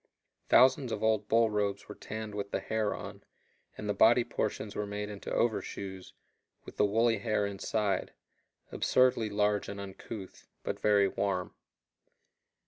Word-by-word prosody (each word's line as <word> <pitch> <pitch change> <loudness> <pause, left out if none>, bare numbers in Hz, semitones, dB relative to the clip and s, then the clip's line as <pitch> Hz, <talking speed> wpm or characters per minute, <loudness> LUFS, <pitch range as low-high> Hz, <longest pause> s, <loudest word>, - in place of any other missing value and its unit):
Thousands 130 0 +5
of 110 - -3
old 110 -2 +2
bull 115 0 +3
robes 100 -1 -1
were 105 - -7
tanned 110 0 -7
with 100 -1 -4
the - - -1
hair 110 -1 -1
on, - - -9 0.5
and 105 - -5
the 105 - +1
body 115 +4 +5
portions 105 -2 -3
were 105 - -2
made 105 0 -4
into 105 -1 -7
overshoes, 100 -5 -2 0.5
with - - -11
the - - +4
woolly 115 +1 +2
hair 105 -1 0
inside 100 +1 -1 0.6
absurdly 125 -4 +2
large 105 0 +1
and 100 0 -6
uncouth, 100 0 -9 0.2
but - - -3
very 100 -2 +4
warm. 95 -1 -2
105 Hz, 145 wpm, -31 LUFS, 100-110 Hz, 0.6 s, Thousands